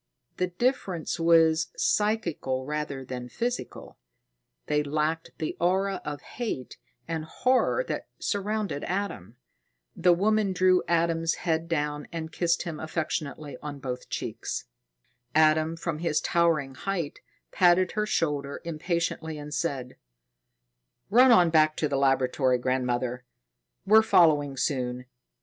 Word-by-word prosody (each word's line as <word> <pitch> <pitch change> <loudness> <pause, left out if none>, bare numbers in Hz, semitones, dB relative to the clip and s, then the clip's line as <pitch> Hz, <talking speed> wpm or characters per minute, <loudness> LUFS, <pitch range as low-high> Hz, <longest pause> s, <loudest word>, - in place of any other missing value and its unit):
The 180 - +1
difference 180 - -1
was 165 -1 +4
psychical 170 -11 0
rather 145 -2 -4
than 125 -1 -6
physical; 240 - -4 0.7
they 150 0 +1
lacked 155 +2 -1
the 155 - -3
aura 190 +2 +1
of 145 -1 -5
hate 220 - -5 0.3
and 165 -1 -3
horror 255 - +1
that - - -4
surrounded 205 -6 -2
Adam. 180 - -4 0.6
The 180 +1 +4
woman 205 +2 +2
drew 185 0 +4
Adam's 165 -1 +1
head 165 -1 0
down 150 -2 -2
and 160 -1 -5
kissed 170 -1 +1
him 165 -3 -5
affectionately 155 -3 -4
on 145 -1 -6
both 130 -2 -6
cheeks. - - -4 0.7
Adam, 155 +1 +4
from 165 -2 -3
his 165 -2 +1
towering 165 -6 +1
height, 170 +1 -3 0.3
patted 180 0 +4
her 210 0 -1
shoulder 145 -7 -1
impatiently 165 -1 -2
and 150 0 -7
said: 130 -7 -3 1.1
"Run 250 +4 +7
on 180 -7 +6
back 155 -1 +4
to 155 - +1
the 140 - -2
laboratory, 130 -1 +2
grandmother. 125 0 -1 0.6
We're 215 +3 +7
following 150 -9 +4
soon. 125 -2 -1
160 Hz, 125 wpm, -27 LUFS, 145-180 Hz, 1.1 s, Run